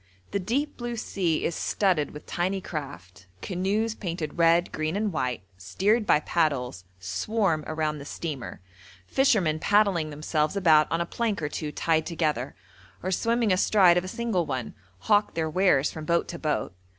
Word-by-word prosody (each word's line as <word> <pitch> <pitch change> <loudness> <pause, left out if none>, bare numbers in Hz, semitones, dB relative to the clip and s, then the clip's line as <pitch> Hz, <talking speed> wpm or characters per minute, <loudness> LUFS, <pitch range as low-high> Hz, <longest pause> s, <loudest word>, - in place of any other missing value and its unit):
The 200 - 0
deep 270 +10 -2
blue 240 -1 -4
sea 180 -7 -1
is 170 - 0
studded 180 -8 +1
with 150 - -11
tiny 185 +3 -1
craft: 135 - -8 0.2
canoes 200 +5 -1
painted 170 -6 -5
red, 170 +1 +4
green, 155 +2 -2
and 205 -2 -1
white, 125 -9 -2 0.2
steered 205 - +1
by 150 - +4
paddles, 130 - -1
swarm 160 - -1
around 155 -1 -2
the 140 - -9
steamer; 145 - -6 0.4
fishermen 190 - +2
paddling 200 -5 +2
themselves 150 +2 -1
about 160 -6 +4
on 165 +1 +1
a - - 0
plank 220 +2 -2
or 150 -2 -2
two 150 0 -4
tied 160 0 0
together, 155 -6 -1 0.5
or 185 - -1
swimming 230 +2 +2
astride 185 -1 +5
of 180 - +1
a - - -6
single 190 -5 -1
one, 130 -4 -3 0.3
hawk 210 -1 +2
their 160 -1 0
wares 155 -5 +3
from 155 -1 -7
boat 170 +2 +1
to 170 - -6
boat. 150 - -1
170 Hz, 165 wpm, -26 LUFS, 150-200 Hz, 0.5 s, astride